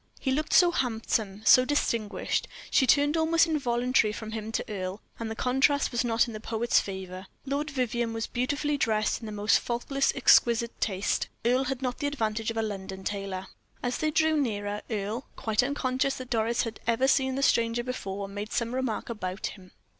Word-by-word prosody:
He 265 - -1
looked 300 +4 -1
so 355 -2 +6
handsome, 220 - -1
so 255 - +8
distinguished; 235 -6 -1 0.2
she 260 - +4
turned 290 +3 +4
almost 325 +1 +4
involuntarily 250 -7 +1
from 220 0 -7
him 220 0 -5
to - - -1
Earle, 190 -2 -4 0.2
and 230 -1 -3
the 220 - -4
contrast 270 +4 +2
was 240 0 0
not 230 -1 +2
in 235 - -7
the 215 - -6
poet's 225 +2 +1
favor. 190 -1 -6 0.2
Lord 285 +3 -2
Vivianne 240 -4 -1
was 225 0 -2
beautifully 285 +4 -1
dressed 215 -3 +1
in 225 - -8
the - - -5
most 210 +1 +3
faultless 275 +3 -1
and - - -1
exquisite 235 -3 +4
taste. 200 -1 0 0.2
Earle 255 +3 +3
had 265 0 -3
not 250 -1 -2
the 285 - 0
advantage 225 -5 -1
of 225 - -4
a 225 - +1
London 190 -2 -5
tailor. 195 -2 -4 0.4
As 245 0 -1
they 310 - +1
drew 315 +1 +2
nearer, 210 -7 -1
Earle, 215 +3 -3
quite 220 -1 +1
unconscious 260 0 0
that 255 -2 -8
Doris 230 0 +1
had 230 -2 -6
ever 235 +3 +2
seen 265 -1 +2
the 275 - -1
stranger 230 -2 +2
before, 200 -6 -4
made 205 +2 -6
some 235 0 -1
remark 255 -4 -2
about 190 -4 -4
him. 185 -3 -8
235 Hz, 190 wpm, -28 LUFS, 215-265 Hz, 0.4 s, so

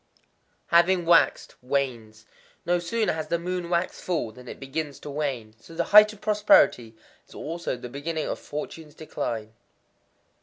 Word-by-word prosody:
_ - - -40 0.5
Having 175 +1 +4
waxed, 170 0 +3
wanes. 120 -5 -3 0.4
No 175 +1 +2
sooner 215 +5 -1
has 155 -1 -4
the 170 +2 0
moon 180 0 -4
waxed 175 +1 -1
full 165 -11 -2
than 125 +3 -14
it - - -9
begins 140 +1 -5
to 145 - -7
wane. 135 -7 -3
So 165 +8 -14
the - - 0
height 210 0 +9
of 215 - -14
prosperity 205 - +3 0.3
is - - -17
also 165 -4 -4
the 125 - -8
beginning 155 +5 -4
of - - -3
fortunes 150 +1 -7
decline. 115 -8 -5
155 Hz, 160 wpm, -25 LUFS, 125-175 Hz, 0.5 s, height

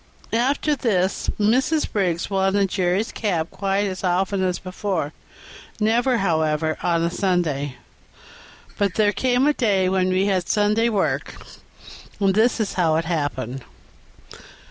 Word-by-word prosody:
After 275 +5 +1
this 195 -7 0
Mrs. 260 +9 +2
Briggs 180 -5 0
wanted 195 0 +1
Jerry's 185 +3 0
cab 175 -7 -2
quite 195 +1 -1
as 190 -1 -4
often 190 +2 0
as 180 -1 0
before, 185 -5 -3 0.7
never, 235 +4 +2
however, 160 -4 0
on 170 -1 +1
a 170 - 0
Sunday; 165 -8 -1 1.0
but 200 -3 +1
there 210 -1 +3
came 255 +2 +1
a 300 - +4
day 200 -8 +1
when 185 -1 +1
we 185 +1 +2
had 185 -3 0
Sunday 210 +2 +2
work, 205 -4 -1 0.8
and 195 -2 +2
this 225 +5 +3
was 215 -3 -2
how 165 -4 +2
it 165 0 0
happened. 135 -6 -3
195 Hz, 135 wpm, -22 LUFS, 175-210 Hz, 1.0 s, a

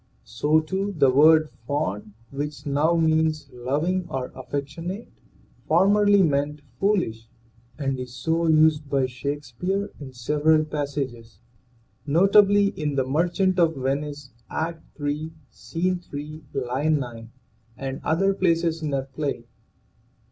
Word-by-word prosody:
So 150 +8 +2
too 190 +5 -2
the 135 -3 +5
word 155 +3 +5 0.2
fond, 110 -8 -2 0.2
which 145 +1 -5
now 150 +4 +2
means 160 -3 +1
loving 150 +9 -1
or 130 -4 -4
affection 140 +6 -5
ate, 205 +5 -7 0.6
formerly 200 +4 +5
meant 145 -1 0 0.2
foolish, 145 - 0 0.5
and 135 -3 -2
is 125 -1 -6
so 160 +7 0
used 155 -2 +4
by 135 -2 +2
Shakespeare 145 +10 -3
in 140 -3 -8
several 150 +5 +2
passages, 135 -7 -4 0.7
notably 200 +5 +5
in 150 -6 -3
"The 135 -1 +1
Merchant 180 +6 +1
of 165 -2 +3
Venice/' 140 +1 -3 0.2
Act 165 +1 -3 0.2
III, 150 +2 -3 0.2
Scene 180 +2 -2
3, 150 -1 -8
line 135 +4 +1
9, 115 -4 -7 0.5
and 135 0 -5
other 195 +6 +2
places 165 -3 +1
in 155 - -2
that 135 -1 -3
play. 140 -6 -3
150 Hz, 125 wpm, -24 LUFS, 135-165 Hz, 0.7 s, the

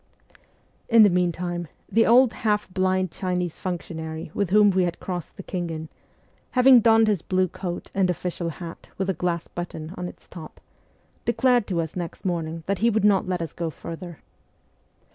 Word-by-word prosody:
In 230 -2 +8
the 205 - +6
meantime 175 -1 -1 0.2
the 225 +1 +3
old 245 0 +6
half 210 -2 0
blind 185 -1 +1
Chinese 180 -2 -3
functionary 160 -3 -5
with 200 -4 -1
whom 205 +1 +6
we 185 0 +2
had 175 - -3
crossed 180 -3 -6
the 195 - -7
Khingan, 165 -4 -4 0.7
having 255 0 +8
donned 225 -1 +5
his 205 -6 +1
blue 185 +1 +1
coat 175 0 -6
and 190 -2 +2
official 175 -1 -2
hat 165 +1 -9
with 190 0 0
a - - -2
glass 170 0 -2
button 170 -1 -6
on 180 0 -4
its - - -13
top, 160 -3 -11 0.6
declared 245 -1 +2
to 175 -4 0
us 160 -1 -6
next 175 0 -6
morning 165 -2 -2
that 200 -1 -1
he 230 - +4
would 220 -2 +1
not 195 -2 +3
let 180 -2 -1
us 165 - -7
go 170 -1 -3
further. 165 +1 -8
180 Hz, 175 wpm, -24 LUFS, 170-205 Hz, 0.7 s, In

